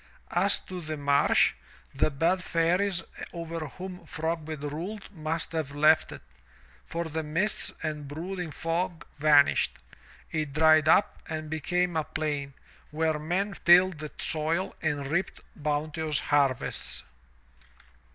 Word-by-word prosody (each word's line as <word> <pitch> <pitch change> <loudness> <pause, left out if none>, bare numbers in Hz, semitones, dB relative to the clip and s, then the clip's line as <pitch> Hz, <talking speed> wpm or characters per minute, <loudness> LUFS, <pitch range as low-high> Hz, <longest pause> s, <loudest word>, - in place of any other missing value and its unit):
As - - +3
to 185 -1 -7
the 155 -1 -4
marsh, 140 0 +4 0.4
the - - +2
bad 170 +6 +1
fairies 175 +2 +1 0.3
over 165 -2 -4
whom 185 +1 -8
Frogbit 160 -2 -3
ruled 175 +10 -5
must 160 +1 -3
have 155 -4 -3
left 155 +2 +4
it, - - -9 0.6
for 170 +1 -2
the 160 0 -3
mists 165 +7 0
and 150 -2 -3
brooding 175 +4 -5
fog 165 +2 -2
vanished; 145 -1 +4 0.5
it 155 -3 -2
dried 155 0 +5
up 195 - +4
and 155 -1 -4
became 175 +3 0
a 160 - +1
plain 145 -3 -3 0.3
where 155 0 0
men 185 +6 -1
tilled 175 -1 +6
the 155 0 -5
soil 160 +4 0
and 145 -3 -1
reaped 175 +6 -1
bounteous 150 0 -1
harvests. 140 -4 0
160 Hz, 125 wpm, -28 LUFS, 150-175 Hz, 0.6 s, tilled